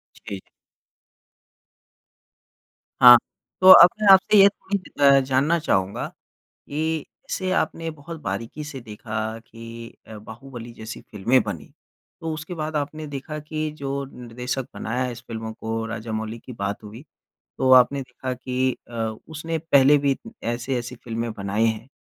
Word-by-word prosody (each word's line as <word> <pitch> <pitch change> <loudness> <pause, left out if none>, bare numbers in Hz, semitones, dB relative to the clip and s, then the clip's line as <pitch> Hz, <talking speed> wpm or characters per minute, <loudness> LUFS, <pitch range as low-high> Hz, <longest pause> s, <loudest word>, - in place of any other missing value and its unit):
जी। 100 - -7 2.6
हाँ। 125 -1 +11 0.4
तो 185 - +10
अब 175 -1 +11
मैं 210 - +2
आपसे 190 +2 +5
ये 195 0 +9
चीज़ 190 -6 -6
अ, 140 0 +7
जानना 135 +6 +2
चाहूँगा 95 -9 0
कि 155 +1 -6 0.2
इसे 185 0 -2
आपने 165 -3 -1
बहुत 155 +2 -10
बारीकी 115 +9 -5
से 145 -3 -7
देखा 110 0 -10 0.3
कि 115 0 -11
अ, 110 -1 -9
बाहुबली 120 +2 -10
जैसी 110 0 -8
फ़िल्में 115 +6 +1
बनी। 100 -7 -7 0.5
तो 160 -1 -3
उसके 155 +3 -6
बाद 155 0 -4
आपने 150 +1 -3
देखा 145 +2 -6
कि 155 +1 -4
जो 140 0 -3
निर्देशक 125 +2 -5
बनाया 125 +3 -2
इस 120 - -9
फ़िल्मों 110 -1 -5
को, 115 0 -4
राजमौली 110 0 -5
की 125 - -11
बात 100 0 -4
हुई। 110 +6 -10 0.6
तो 130 - +2
आपने 130 +2 +6
देखा 130 0 -6
कि 130 0 -1
अ, - - -10 0.3
उसने 160 +1 -4
पहले 145 -2 +5
भी 140 -1 +1 0.3
ऐसी-ऐसी 120 +1 -3
फ़िल्में 115 0 -3
बनाई 105 +2 0
हैं 110 +2 -2
130 Hz, 140 wpm, -23 LUFS, 115-150 Hz, 2.6 s, हाँ